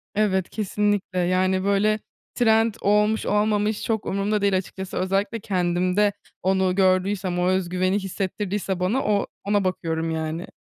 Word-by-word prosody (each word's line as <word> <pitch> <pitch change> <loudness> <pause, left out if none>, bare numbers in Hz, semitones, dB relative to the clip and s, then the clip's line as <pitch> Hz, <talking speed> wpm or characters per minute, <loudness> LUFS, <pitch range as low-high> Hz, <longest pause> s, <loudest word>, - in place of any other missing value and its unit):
Evet, 190 -3 +1
kesinlikle, 205 -2 -1
yani, 185 +1 +1
böyle, 200 +2 +2 0.4
trend 225 -2 +3
olmuş 210 +2 +2
olmamış 210 0 +1
çok 220 -2 -1
umrumda 200 +2 0
değil 200 -1 +3
açıkçası. 190 0 -6
Özellikle 195 +4 0
kendimde 185 +1 +1 0.3
onu 190 0 +2
gördüysem, 185 -1 +1
o 180 - +1
özgüveni 185 +1 +1
hissettirdiyse 195 0 -3
bana 210 +9 0
o 205 -1 +1 0.2
ona 205 0 +1
bakıyorum 165 -3 -2
yani. 160 +1 -3
195 Hz, 130 wpm, -24 LUFS, 185-210 Hz, 0.4 s, trend